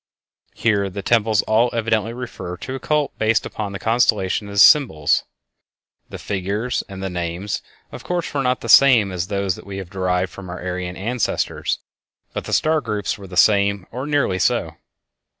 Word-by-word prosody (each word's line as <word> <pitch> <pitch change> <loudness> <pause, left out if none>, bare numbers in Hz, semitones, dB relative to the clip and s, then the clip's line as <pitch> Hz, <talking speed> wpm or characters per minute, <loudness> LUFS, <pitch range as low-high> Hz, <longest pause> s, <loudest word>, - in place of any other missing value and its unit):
Here 100 -3 +1
the 100 +1 -6
temples 110 -2 +2
all 115 +3 +3
evidently 115 -1 0
refer 115 -7 -7
to 130 - -6
a 135 - -4
cult 150 0 -1
based 110 +1 +2
upon 105 -2 -5
the 100 - -5
constellations 105 -3 +1
as 100 0 +3
symbols. 80 - +4 0.8
The - - -7
figures 100 +5 -2
and 95 0 -7
the 95 - -2
names, 90 +3 -3 0.3
of - - -9
course, 175 -4 -3
were 140 - 0
not 125 -1 0
the - - -6
same 115 -4 +6
as 90 -1 -3
those 100 -2 -1
that - - -13
we 100 -1 -6
have 95 -2 -7
derived 90 -1 -1
from 95 -2 -10
our 90 - -6
Aryan 90 0 -4
ancestors, 115 +4 -1 0.6
but - - -4
the - - -6
star 155 0 +2
groups 105 -5 -3
were 100 - -10
the 90 -1 -8
same 100 -1 +3
or 130 +4 -5
nearly 145 -11 +1
so. - - 0
100 Hz, 180 wpm, -21 LUFS, 95-120 Hz, 0.8 s, same